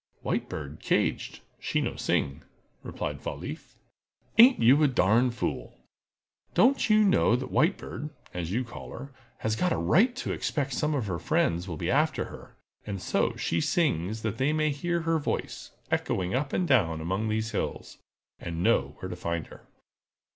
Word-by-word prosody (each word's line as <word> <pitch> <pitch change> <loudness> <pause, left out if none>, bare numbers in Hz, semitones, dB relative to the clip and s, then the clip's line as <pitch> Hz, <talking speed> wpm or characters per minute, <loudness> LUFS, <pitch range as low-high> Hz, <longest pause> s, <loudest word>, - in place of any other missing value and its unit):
"White - - -1
Bird - - -6
caged—she - - -1
no - - -2
sing!" 70 +3 -1 0.4
replied 75 -1 -5
Fall - - -4
leaf. - - -8 0.6
"Ain't 250 +3 +8
you 130 +6 +6
a 150 - +6
darn 120 0 +3
fool? 115 - -4 0.8
Don't 260 +1 +4
you 215 0 +6
know 190 - +4
that 130 +1 -4
White 170 +6 +3
Bird, 150 - -6 0.2
as 85 -1 -4
you 120 +5 0
call 120 - -9
her, 140 - -8 0.3
has 110 0 -1
got 180 +8 +1
a - - +1
right 195 - +3
to 270 - -3
expect 140 -3 -2
some 150 +3 0
of 130 -6 -1
her 90 -4 -3
friends 85 +4 0
will 85 -4 -5
be - - -1
after - - +2
her, - - -12 0.3
and 100 -2 -5
so - - 0
she 85 - -1
sings 110 - 0
that 110 +1 -3
they 135 +3 +2
may 155 -1 +1
hear 170 +4 -1
her 165 0 +1
voice, 145 - -3 0.2
echoing 90 -1 0
up 135 +2 -1
and 180 - 0
down 90 - +3
among 95 +7 -2
these 110 +1 -1
hills, - - -4 0.4
and 85 0 -4
know 75 -11 +2
where 95 - -6
to 90 - -5
find 85 -2 -3
her?" - - -15
115 Hz, 175 wpm, -28 LUFS, -, 0.8 s, Ain't